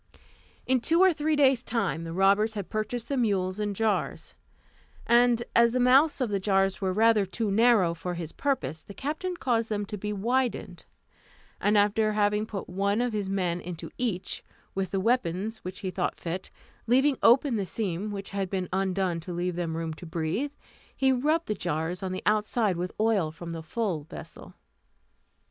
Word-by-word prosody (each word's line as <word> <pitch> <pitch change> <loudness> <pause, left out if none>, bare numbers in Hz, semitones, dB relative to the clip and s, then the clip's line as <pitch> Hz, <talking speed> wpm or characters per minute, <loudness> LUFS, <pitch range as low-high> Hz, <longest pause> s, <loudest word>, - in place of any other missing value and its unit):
In 260 0 +2
two 325 +8 +2
or 375 -1 +6
three 310 0 0
days' 270 -4 +4
time 200 -9 -1
the 165 - -5
robbers 200 +5 +3
had 200 -3 -5
purchased 225 +2 -2
the 280 - -1
mules 195 -5 0
and 205 -1 -2
jars, 220 0 -1 0.7
and 235 0 +4
as 235 0 +5
the 255 - +1
mouths 270 +6 +5
of 240 -4 0
the 200 - +1
jars 195 0 +1
were 190 -1 +1
rather 220 +1 +4
too 205 +2 -2
narrow 215 -5 +4
for 175 +1 -5
his 165 -2 -5
purpose, 160 - -2
the 200 - -12
captain 330 +6 -3
caused 230 -6 0
them 205 -1 -1
to 210 0 -6
be 210 +2 -3
widened, 220 -3 -1 0.7
and 210 +1 +3
after 210 +1 +3
having 210 0 +1
put 200 -3 -5
one 200 +3 0
of 245 -1 0
his 205 -2 -2
men 180 -3 -1
into 175 -2 -7
each, 220 -7 -2 0.3
with 190 -1 -2
the 195 +1 -1
weapons 215 -1 0
which 185 +2 -7
he 190 -3 -3
thought 180 -1 -2
fit, 175 +2 -4 0.4
leaving 265 +4 +4
open 250 +2 +5
the 200 - 0
seam 200 0 -2
which 200 -1 -6
had 195 -2 -2
been 185 -1 -2
undone 190 -2 0
to 170 +2 -7
leave 175 0 -2
them 165 -2 -2
room 165 -1 -3
to 170 +2 -10
breathe, 170 - -2 0.4
he 265 -1 +3
rubbed 305 +6 +1
the - - -1
jars 175 -1 -2
on 190 -1 -3
the 185 - -4
outside 215 -1 +2
with 180 +1 -3
oil 215 -7 +2
from 170 +2 -8
the 165 -1 -5
full 175 -1 -2
vessel. - - -11
205 Hz, 185 wpm, -27 LUFS, 180-235 Hz, 0.7 s, or